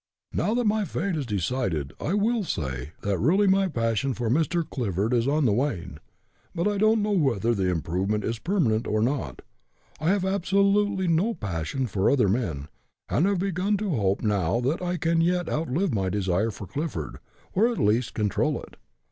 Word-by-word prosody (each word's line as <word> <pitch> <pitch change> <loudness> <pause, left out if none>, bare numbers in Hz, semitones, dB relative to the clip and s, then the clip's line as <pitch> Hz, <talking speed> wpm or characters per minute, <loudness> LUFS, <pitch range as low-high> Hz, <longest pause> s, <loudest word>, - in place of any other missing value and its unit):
Now 220 - 0
that 245 -1 +1
my 215 0 +2
fate 180 +1 -2
is 145 -5 -3
decided, 95 - -1
I 175 - 0
will 220 +2 +1
say 70 - -4
that 100 -2 -1
really 185 - +3
my 195 0 +3
passion 115 - -1
for 115 -2 -1
Mr. 165 +3 +1
Clifford 110 - -1
is 120 0 +2
on 145 +1 +2
the 110 - +3
wane, 100 - -2 0.6
but 170 +4 0
I 205 -1 0
don't 215 0 +3
know 210 - 0
whether 120 - +2
the 95 -4 0
improvement 90 +5 -1
is 115 0 -2
permanent 130 - +1
or 110 0 +1
not. 115 - -2 0.6
I 155 +2 0
have 195 -1 +2
absolutely 200 0 +2
no 175 +8 +2
passion 100 - -3
for 100 -4 +1
other 125 -7 +3
men, 90 - -1 0.4
and 170 - +2
have 200 -1 +1
begun 195 +2 0
to 205 -1 -2
hope 100 -4 0
now 100 -1 +1
that 140 +8 0
I 180 0 -1
can 165 +1 +1
yet 175 0 +1
outlive 160 +3 -1
my 95 -3 0
desire 95 +2 0
for 100 -1 -7
Clifford, 95 - -4 0.3
or 215 +5 +4
at 240 - -2
least 115 -1 +1
control 105 -3 0
it. - - -14
135 Hz, 185 wpm, -26 LUFS, -, 0.6 s, or